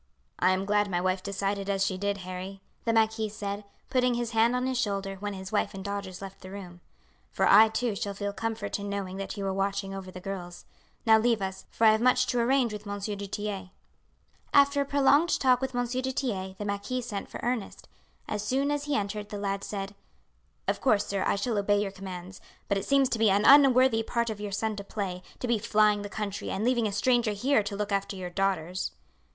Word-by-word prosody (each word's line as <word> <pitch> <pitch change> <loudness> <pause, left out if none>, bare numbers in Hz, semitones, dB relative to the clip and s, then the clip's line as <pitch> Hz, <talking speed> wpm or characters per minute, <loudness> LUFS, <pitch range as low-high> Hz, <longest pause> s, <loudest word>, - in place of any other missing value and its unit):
"I 185 - +4
am 185 +1 +1
glad 205 0 +2
my 175 -2 0
wife 185 +1 0
decided 200 0 -2
as 195 -1 +1
she 190 - -1
did, 200 +1 -1
Harry," 185 +1 -7 0.2
the 230 - +2
marquis 220 -1 +2
said, 205 0 -5 0.3
putting 250 -1 +3
his 240 -1 -2
hand 230 +2 +3
on 250 0 0
his 260 -1 0
shoulder 195 -4 -2
when 205 0 -3
his 190 0 -7
wife 205 -2 0
and 190 0 -7
daughters 200 -2 -5
left 195 0 -9
the 185 - -9
room, 180 -3 -9 0.5
"for - - +1
I 215 +3 +8
too 220 0 -1
shall 200 0 -3
feel 200 0 -3
comfort 220 -2 -3
in 200 0 -5
knowing 195 -2 -4
that 195 +2 -5
you 200 - -3
are 195 - 0
watching 195 0 -1
over 190 -1 -6
the 185 - -8
girls. 180 -2 -7 0.4
Now 220 -1 +7
leave 230 0 +2
us, 190 -1 -4
for 225 - +1
I 220 - +9
have 220 +1 +2
much 250 +1 +4
to 245 - 0
arrange 245 -1 +2
with 210 0 -7
Monsieur 205 +1 -3
du 200 0 -6
Tillet." 200 -2 -4 0.9
After 280 0 +5
a - - 0
prolonged 285 +4 +3
talk 255 -1 +4
with 265 -1 -3
M. 245 0 +1
du 250 +2 -2
Tillet 190 -8 -3
the 205 - -5
marquis 200 +5 -2
sent 210 -4 -5
for - - -7
Ernest. 240 -4 -3 0.4
As 210 - -2
soon 270 +6 +1
as 290 0 -1
he 295 -1 0
entered 205 0 -2
the 205 - -5
lad 200 -1 -2
said: 195 -1 -4 0.7
"Of - - 0
course, 215 -6 +3
sir, 195 -1 -1
I - - +2
shall 215 +1 0
obey 205 0 +2
your 205 -1 -1
commands; 185 -1 -8 0.3
but 200 - +1
it - - -6
seems 275 -1 +4
to 230 - -1
me 220 -1 +5
an 200 +2 +3
unworthy 260 -4 +7
part 235 +1 -1
for 205 - -12
your 205 -1 -4
son 215 +2 -1
to 200 - -5
play, 195 -3 -4 0.2
to 250 - -4
be 235 -2 +2
flying 210 -1 +3
the 205 - -6
country 200 -1 -4
and 195 - -2
leaving 240 -3 +2
a - - -3
stranger 240 +1 +2
here 245 +4 +2
to 200 0 -4
look 210 0 -3
after 200 0 -1
your 180 -2 -6
daughters." 185 -2 -1
205 Hz, 230 wpm, -28 LUFS, 195-235 Hz, 0.9 s, I